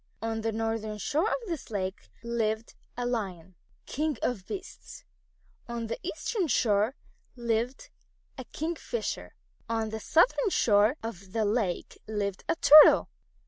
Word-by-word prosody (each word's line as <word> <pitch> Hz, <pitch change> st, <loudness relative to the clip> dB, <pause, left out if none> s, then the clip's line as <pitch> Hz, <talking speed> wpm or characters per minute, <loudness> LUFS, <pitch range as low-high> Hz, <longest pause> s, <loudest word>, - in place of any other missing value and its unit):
On 225 Hz, 0 st, -3 dB
the 225 Hz, 0 st, -1 dB
northern 220 Hz, -1 st, -2 dB
shore 300 Hz, -, 0 dB
of -, -, +1 dB
this 330 Hz, -5 st, -5 dB
lake 190 Hz, -3 st, -4 dB
lived 225 Hz, -1 st, -2 dB, 0.2 s
a 245 Hz, -, -2 dB
Lion, 190 Hz, -7 st, -3 dB, 0.3 s
King 300 Hz, -1 st, -2 dB
of 210 Hz, -7 st, -2 dB
Beasts. 385 Hz, 0 st, -8 dB, 0.6 s
On 235 Hz, -1 st, -4 dB
the 230 Hz, -, -4 dB
eastern 355 Hz, +4 st, -2 dB
shore 220 Hz, -1 st, +2 dB, 0.4 s
lived 235 Hz, +1 st, -2 dB, 0.4 s
a -, -, -8 dB
Kingfisher. 340 Hz, +9 st, -4 dB, 0.3 s
On 225 Hz, -1 st, -1 dB
the 220 Hz, 0 st, -5 dB
southern 395 Hz, -, +3 dB
shore 215 Hz, -, +3 dB
of 195 Hz, -4 st, -7 dB
the 225 Hz, -2 st, +1 dB
lake 205 Hz, -4 st, -1 dB
lived 200 Hz, -3 st, -3 dB
a -, -, +3 dB
Turtle. 300 Hz, -1 st, +8 dB
225 Hz, 135 wpm, -28 LUFS, 210-275 Hz, 0.6 s, Turtle